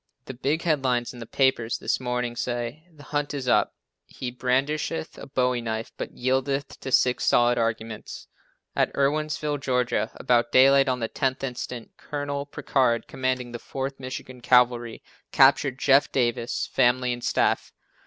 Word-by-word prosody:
The 130 - -7
big 145 +6 -1
headlines 130 -7 0
in 120 - -11
the 115 - -8
papers 125 -4 +1
this - - -1
morning 125 -1 -2
say, 120 +6 -4
"The 150 -3 -16
hunt 145 0 -2
is 135 -3 -4
up. - - +2 0.3
He 125 - -6
brandisheth 135 +6 -1
a - - -9
bowie 125 -2 0
knife 110 -1 -4
but - - -6
yieldeth 135 +2 -1
to 135 - -6
six 125 0 +3
solid 120 0 +3
arguments. 110 -1 -4 0.5
At - - +2
Irwinsville, 150 +1 0
Ga., 125 -4 0
about 120 -1 +1
daylight 135 +1 +6
on 125 -1 -1
the 115 - 0
10th 130 -2 -1
instant, 125 -2 -5
Col. 145 -1 -4
Prichard, 125 -4 0
commanding 130 -1 -2
the 120 - -6
4th 135 +2 -5
Michigan 130 -1 -7
Cavalry, 120 -1 +2 0.3
captured 135 -2 +4
Jeff 140 0 +4
Davis, 120 -2 0
family 125 -1 +3
and 120 0 -8
staff. - - +1
130 Hz, 155 wpm, -25 LUFS, 120-140 Hz, 0.5 s, daylight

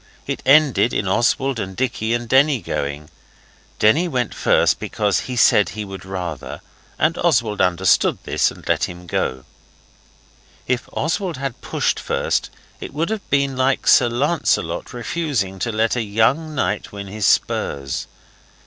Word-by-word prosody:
It - - -4
ended 140 -4 +5
in 100 - -1
Oswald 120 +5 +1
and 95 -2 -5
Dicky 120 -2 -1
and 120 0 -4
Denny 135 +2 +4
going. 75 -4 -4 0.7
Denny 150 +12 +3
went 125 -7 -2
first - - +2
because 105 -3 0
he 125 - -3
said 105 -3 +4
he 105 -1 -6
would 95 -2 -9
rather 90 -6 -6 0.4
and 160 +2 +1
Oswald 120 -11 +1
understood 90 0 +3
this - - +1
and - - -13
let - - +2
him. 90 0 -10 1.6
If 125 -1 -2
Oswald 170 +1 -2
had 130 -2 -5
pushed - - -1
first - - -1 0.3
it - - -8
would 165 +7 -1
have 220 -2 -5
been 140 -1 +1
like 130 +1 +1
Sir 120 - +5
Lancelot 120 - 0
refusing 120 - -2
to 115 - -1
let 110 +2 +1
a 120 - 0
young 115 +9 +1
knight 105 -6 -1
win 100 -1 -7
his 100 +1 -2
spurs. 70 -2 0
120 Hz, 150 wpm, -20 LUFS, 100-140 Hz, 1.6 s, ended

